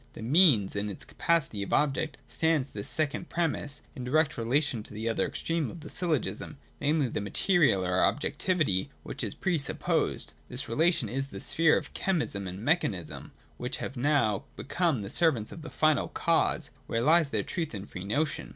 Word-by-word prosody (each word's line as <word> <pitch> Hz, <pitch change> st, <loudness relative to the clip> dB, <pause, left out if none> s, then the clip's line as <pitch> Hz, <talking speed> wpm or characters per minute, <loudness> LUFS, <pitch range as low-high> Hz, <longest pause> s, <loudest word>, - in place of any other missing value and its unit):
The -, -, -8 dB
Means 125 Hz, -, +4 dB
in 100 Hz, +1 st, -1 dB
its 100 Hz, -, -8 dB
capacity 150 Hz, -11 st, +1 dB
of 100 Hz, -, -5 dB
object 150 Hz, +1 st, +1 dB
stands, 160 Hz, -4 st, +1 dB
in -, -, -24 dB
this 100 Hz, -, -2 dB
second 155 Hz, +2 st, 0 dB
premiss, 160 Hz, -4 st, -2 dB
in 130 Hz, -, -6 dB
direct 155 Hz, +5 st, +2 dB
relation 120 Hz, +1 st, 0 dB
to 105 Hz, -, -12 dB
the 110 Hz, +2 st, -3 dB
other 115 Hz, -, +1 dB
extreme 165 Hz, -2 st, -2 dB
of 170 Hz, -, -9 dB
the 150 Hz, -, -9 dB
syllogism, 160 Hz, -, 0 dB, 0.2 s
namely, 145 Hz, -1 st, +2 dB
the 110 Hz, -, -3 dB
material 105 Hz, -, +2 dB
or 90 Hz, 0 st, +1 dB
ob -, -, +3 dB
jectivity 150 Hz, -, 0 dB, 0.2 s
which -, -, -5 dB
is -, -, -3 dB
pre 175 Hz, -4 st, 0 dB
supposed. 140 Hz, -, -1 dB, 0.2 s
This 130 Hz, +3 st, -4 dB
relation 160 Hz, +7 st, +2 dB
is 135 Hz, +5 st, -3 dB
the -, -, -8 dB
sphere 165 Hz, -1 st, +3 dB
of -, -, -6 dB
chemism 150 Hz, -, -1 dB
and 95 Hz, +5 st, -7 dB
mechanism, 110 Hz, -, -1 dB, 0.3 s
which -, -, -4 dB
have -, -, -5 dB
now 125 Hz, -6 st, +1 dB
become 155 Hz, -, 0 dB
the 100 Hz, -, -6 dB
servants 130 Hz, -11 st, +2 dB
of 165 Hz, -, -9 dB
the 160 Hz, -, -8 dB
Final 155 Hz, -1 st, +2 dB
Cause, 165 Hz, -3 st, +1 dB, 0.2 s
where 115 Hz, -, 0 dB
lies 160 Hz, +1 st, +5 dB
their -, -, 0 dB
truth 165 Hz, -9 st, -3 dB
and 100 Hz, -, -7 dB
free 90 Hz, -, -7 dB
notion. 145 Hz, +10 st, -1 dB
145 Hz, 190 wpm, -29 LUFS, 110-160 Hz, 0.3 s, lies